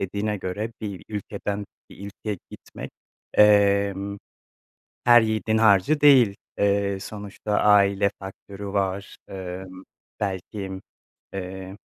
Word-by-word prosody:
dediğine 100 +2 -2
göre 100 +5 -4
bir 100 -6 -6
ülkeden 105 0 -4 0.3
bir 100 - -10
ülkeye 100 0 -5
gitmek, - - -10 0.4
emm, 100 -1 +4 0.9
her 120 0 +8
yiğidin 110 0 0
harcı 110 +7 +4
değil. 130 -8 +6 0.2
Eee, 100 -1 +1
sonuçta 105 +1 -6
aile 100 -1 +4
faktörü 100 +1 -9
var, 100 0 -2
ımm, 95 0 -7 0.4
belki, 95 -1 -4 0.5
eee, 95 0 -6
100 Hz, 100 wpm, -24 LUFS, 95-105 Hz, 0.9 s, her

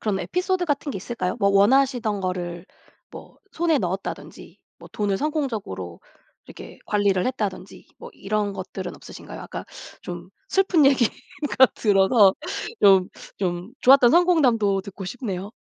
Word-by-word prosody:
그런 205 -3 -1
에피소드 365 - -1
같은 290 -2 -2
게 - - -5
있을까요? 185 -2 -4
뭐 200 - +3
원하시던 220 0 +2
거를 180 -1 -4 0.4
뭐 - - -13
손에 330 -2 +1
넣었다든지 190 -1 -6 0.2
뭐 - - -14
돈을 205 -2 -1
성공적으로 220 - -4 0.5
이렇게 - - -12
관리를 200 -3 +1
했다든지 205 -6 -5
뭐 - - -10
이런 205 0 -2
것들은 190 -1 -7
없으신가요? - - -11
아까 - - -7 0.4
좀 - - -8 0.2
슬픈 370 -7 +3
얘기가 260 -5 +3 0.6
들어서 200 -1 +4 0.5
좀 190 -2 +5 0.3
좀 180 +2 -3
좋았던 255 -2 +6
성공담도 255 - +3
듣고 195 0 -9
싶네요. 195 -2 -5
205 Hz, 315 characters per minute, -23 LUFS, 190-270 Hz, 0.6 s, 좋았던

